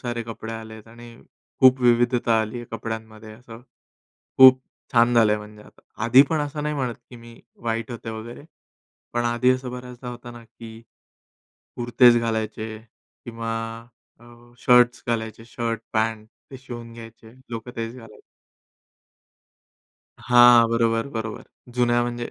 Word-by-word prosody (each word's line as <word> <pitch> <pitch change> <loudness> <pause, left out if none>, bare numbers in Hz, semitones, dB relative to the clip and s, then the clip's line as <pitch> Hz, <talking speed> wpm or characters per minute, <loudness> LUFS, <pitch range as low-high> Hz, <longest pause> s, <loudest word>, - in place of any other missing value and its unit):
सारे 120 -2 -4
कपडे 115 0 -8
आलेत 110 0 -10
आणि 120 0 -14 0.4
खूप 130 0 +6
विविधता 120 -1 +3
आली 110 +2 -4
आहे 120 - -7
कपड्यांमध्ये 110 -1 -7
असं, 115 0 -13 0.8
खूप 130 0 +8 0.3
छान 120 0 +4
झालंय 105 -2 +4
म्हणजे 105 0 -12
आता. - - -20 0.2
आधी 125 +3 +7
पण 160 - 0
असं 145 +1 -5
नाही 150 0 -2
म्हणत 125 -4 -3
की 125 - -12
मी 115 0 -14 0.2
वाईट 115 0 -3
होते 115 -1 -7
वगैरे 115 +4 -9 0.7
पण 120 0 0
आधी 120 +2 +2
असं 130 -1 -3
बऱ्याचदा 125 0 -9
होतं 120 0 -10
ना, 120 - -12
की 115 0 -13 1.0
कुर्तेच 120 0 +4
घालायचे 110 -1 -3 0.5
किंवा 115 -1 -6 0.7
अ, - - -18 0.3
शर्ट्स 125 0 +4
घालायचे, 110 -1 -3
शर्ट, 115 -1 -4
पँट 110 0 -1 0.2
ते 135 - -10
शिवून 120 -3 -10
घ्यायचे 115 -1 -13 0.2
लोकं, 115 +1 -6
तेच 115 +1 -4
घालायचे. 115 -4 -14 2.0
हां, 120 -1 +6
बरोबर, 115 +1 +1
बरोबर. 110 -4 -5 0.3
जुन्या 120 -1 +2
म्हणजे 120 0 -4
115 Hz, 135 wpm, -23 LUFS, 115-120 Hz, 2.0 s, खूप